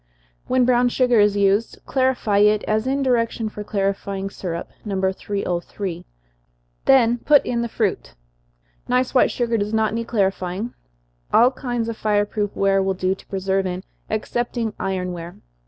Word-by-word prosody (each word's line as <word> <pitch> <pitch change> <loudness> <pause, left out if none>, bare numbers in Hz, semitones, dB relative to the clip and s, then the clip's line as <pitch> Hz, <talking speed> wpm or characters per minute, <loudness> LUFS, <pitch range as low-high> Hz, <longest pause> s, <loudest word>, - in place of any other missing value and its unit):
When 255 -1 +3
brown 245 0 +3
sugar 245 -2 +3
is 205 0 +4
used, 200 +3 +2
clarify 255 -6 +1
it, 210 0 +4
as 215 +3 0
in 275 +1 0
direction 230 -3 0
for 210 0 -7
clarifying 195 -1 -2
syrup, 170 -4 -5
No. 200 -3 -3
303, 190 -1 -3 0.8
then 240 -3 +5
put 290 +3 +4
in 235 -1 -1
the 235 - -2
fruit. - - -2 0.7
Nice 250 +1 +1
white 255 - +5
sugar 235 -2 0
does 210 +2 -1
not 220 -1 +1
need 230 0 -3
clarifying. 195 0 -1 0.6
All 245 +3 +6
kinds 245 -4 -3
of 230 -1 -4
fire 205 -1 +1
proof 205 -1 -3
ware 195 0 +2
will 190 0 0
do 185 0 0
to 195 - -14
preserve 190 0 -1
in, 180 +1 -4 0.3
excepting 230 +1 -2
iron 185 -1 -2
ware. 170 0 -8
210 Hz, 155 wpm, -22 LUFS, 195-240 Hz, 0.8 s, All